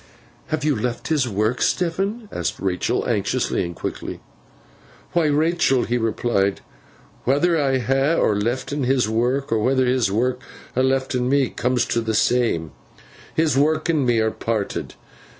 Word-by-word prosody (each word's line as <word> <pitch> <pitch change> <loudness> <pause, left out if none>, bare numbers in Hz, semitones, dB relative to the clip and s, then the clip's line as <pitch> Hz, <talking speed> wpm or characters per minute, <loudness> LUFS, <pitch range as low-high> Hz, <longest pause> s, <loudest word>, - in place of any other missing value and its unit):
'Have 155 -1 -2
you 150 -2 +2
left 120 +4 -3
his 145 -6 +1
work, 110 +4 0
Stephen?' 195 +6 0
asked - - -3
Rachael, 95 -2 -1
anxiously - - 0
and 85 0 -5
quickly. - - -5 0.9
'Why, 170 -3 +3
Rachael,' 150 -3 +2
he 120 +1 0
replied, 110 -3 0 0.6
'whether 145 +7 +2
I 135 -4 +2
ha 135 +6 +1 0.2
lef'n 125 +6 -1
his 130 -3 +2
work, 120 +5 0
or 115 - +2
whether 130 +3 +2
his 125 -5 +1
work 125 +4 0 0.3
ha 130 - +1
lef'n 130 -1 +1
me, 140 -2 +2
cooms 125 -1 0
t' 115 - 0
th' 110 -1 -2
same. 110 - +1 0.6
His 155 -4 +2
work 155 +3 +2
and 155 -4 +2
me 120 -2 +2
are 110 0 +1
parted. 110 -3 -3
130 Hz, 150 wpm, -22 LUFS, 115-145 Hz, 0.9 s, Why